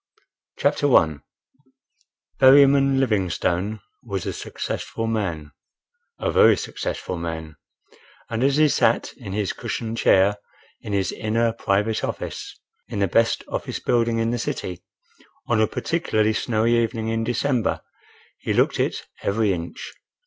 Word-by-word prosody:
CHAPTER - - +1
I 80 -2 +3 1.2
Berryman 135 0 +6
Livingstone 100 -3 0 0.2
was 100 -6 -4
a - - -2
successful 115 - -5
man, 90 -10 -2 0.7
a - - -1
very - - +6
successful 90 - -4
man, 80 -2 -6 0.7
and 115 +2 -2
as 140 +1 +3
he 155 0 +5
sat 145 - +1
in 95 - -8
his 105 -2 -1
cushioned 115 0 -4
chair 100 +2 +4 0.4
in 105 - -7
his 95 -1 0
inner 115 +1 0
private 105 0 0
office - - -5 0.3
(in - - -6
the 100 -1 +2
best 115 +6 +2
office - - -4
building 115 -1 +1
in 115 0 0
the 120 - -2
city) 90 -4 -4 0.6
on 115 -2 +2
a 110 - +3
particularly 110 -11 0
snowy 115 +1 +1
evening 115 -1 -1
in 115 0 -1
December, 120 +1 0 0.6
he - - -2
looked - - +2
it - - -1 0.2
every 100 0 +1
inch. 85 -1 -6
110 Hz, 135 wpm, -23 LUFS, 95-115 Hz, 1.2 s, Berryman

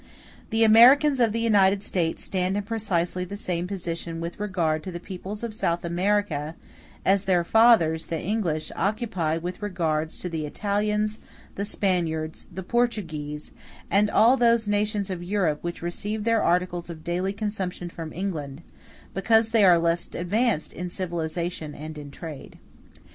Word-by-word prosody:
The 225 0 +3
Americans 260 +6 +7
of 230 -3 +4
the 230 - -1
United 200 -3 +4
States 170 -5 -1
stand 185 +1 -1
in 205 - -1
precisely 190 -5 -1
the 200 +3 -6
same 180 -3 -2
position 170 -3 -4
with 170 +3 -5
regard 170 -6 0
to 185 - -6
the 175 - -6
peoples 195 +4 -7
of 230 -2 -4
South 175 -6 -1
America 170 -4 0 0.5
as 195 +1 +3
their 180 -3 +3
fathers, 185 -6 +4
the 165 - -2
English, 170 -6 -2
occupy 195 -7 -1
with 175 +5 -5
regard 160 -6 -1
to 180 - -7
the 160 -3 -3
Italians, 210 +4 -1 0.3
the 200 - -3
Spaniards, 170 -6 -1
the 190 +2 -6
Portuguese, 165 -10 -2 0.4
and 205 +1 +4
all 240 +6 +5
those 235 -2 +3
nations 205 -1 0
of 180 -2 -4
Europe 175 -5 0
which 170 0 -5
receive 205 +5 -3
their 230 -1 +2
articles 175 0 0
of 160 -2 -8
daily 180 +3 -1
consumption 200 -4 -4
from 165 -2 -7
England, 160 -6 -4 0.5
because 220 +3 +3
they 225 -2 +4
are 180 -3 +7
less 170 0 0
advanced 200 0 0
in 180 +2 -5
civilization 170 -3 -4
and 150 -1 -8
trade. 155 -2 -9
185 Hz, 155 wpm, -25 LUFS, 165-210 Hz, 0.5 s, Americans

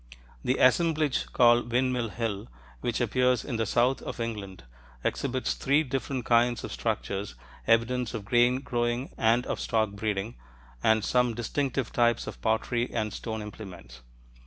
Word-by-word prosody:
The 130 - +1
assemblage 155 +1 +3
called 120 -1 +4
Windmill 125 -1 +1
Hill, 105 -2 -3 0.3
which 120 -2 -2
appears 125 +2 +2
in 120 -5 -3
the 110 -1 0
south 125 +5 +2
of - - -6
England, 105 - -5 0.4
exhibits 130 -2 -1
three 140 +3 +2
different 135 -2 -3
kinds 120 0 +3
of - - -5
structures, 95 +7 -3 0.3
evidence 115 +1 +2
of 105 -3 -5
grain 120 +3 +3
growing 120 0 -1
and 115 +2 +2
of - - -3
stock 110 -3 0
breeding, 105 +2 -3 0.4
and 110 - +3
some 125 -2 +2
distinctive 130 +2 -2
types 120 -1 +2
of - - -8
pottery 115 +2 0
and 110 -2 -2
stone 110 -2 -4
implements. 90 - -10
120 Hz, 145 wpm, -28 LUFS, 110-125 Hz, 0.4 s, called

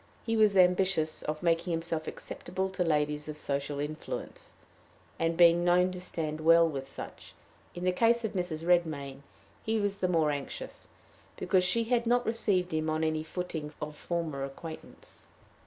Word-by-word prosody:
He 225 - 0
was 215 -3 +4
ambitious 180 -3 +3
of 155 +1 -4
making 170 +1 +1
himself 165 -1 -2
acceptable 190 +2 -4
to 185 -1 0
ladies 150 -2 0
of 150 0 -7
social 140 0 -2
influence, 150 +2 -6 0.7
and 165 0 +1
of - - -9
being 170 0 +6
known 180 +1 +4
to 180 0 -7
stand 155 -3 -4
well 165 +1 +6
with 135 -4 -5
such. - - -10 0.4
In 175 - -6
the 185 - +3
case 230 +4 +2
of 220 - -3
Mrs. 175 -4 -3
Redmain 155 -6 +1 0.4
he 220 0 0
was 200 -1 -1
the 185 - +1
more 160 -4 +2
anxious, 145 - -6 0.5
because 185 -2 +2
she 205 +6 +2
had 235 0 +1
not 245 +1 +3
received 195 -6 +1
him 155 0 0
on 155 0 0
any 155 0 0
footing 160 -2 -5
of 150 0 -5
former 160 -5 -3
acquaintance. 160 +4 -10
170 Hz, 170 wpm, -30 LUFS, 155-185 Hz, 0.7 s, being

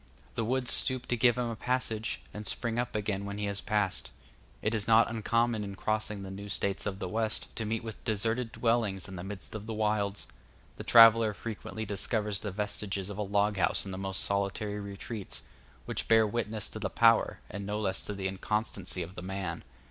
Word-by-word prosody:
The 115 - -1
woods 125 +2 +2
stoop 130 -1 +3
to 120 - +3
give 120 0 +4
him 120 -1 0
a - - -4
passage, 115 -2 -1
and 105 - -6
spring 115 +2 -1
up 120 -2 -2
again 100 -2 -1
when 100 0 -5
he 105 - -1
has 100 0 -2
passed. 105 -3 0 0.5
It 110 - +1
is 105 -2 +1
not 115 +1 +6
uncommon 115 0 +1
in 100 -1 -6
crossing 105 -1 -1
the 95 - -6
new 100 +1 -7
States 100 0 0
of 100 -2 -2
the - - -4
West 110 0 -1
to 110 - -3
meet 110 +1 -1
with 110 -1 -8
deserted 115 +2 0
dwellings 115 -7 +1
in 95 - -7
the 85 - -6
midst 95 0 -6
of 110 0 -6
the 110 - -3
wilds; 105 -2 0 0.5
the - - -6
traveller 115 -2 +8
frequently 110 0 -5
discovers 105 0 0
the 105 - -3
vestiges 100 -1 -2
of 100 - -7
a - - +1
log 100 0 +1
house 85 +1 +2
in 95 - -5
the 95 - -5
most 95 0 -2
solitary 100 +1 -1
retreats, 100 +1 -4 0.4
which - - -2
bear 110 -1 +6
witness 110 0 -2
to - - -6
the - - -1
power, - - +4
and 100 -1 -6
no 105 +1 -1
less 95 -3 -1
to 105 - -3
the 95 -1 -2
inconstancy 95 -1 -2
of 90 +1 -8
man. 95 -3 -4
105 Hz, 205 wpm, -30 LUFS, 100-115 Hz, 0.5 s, traveller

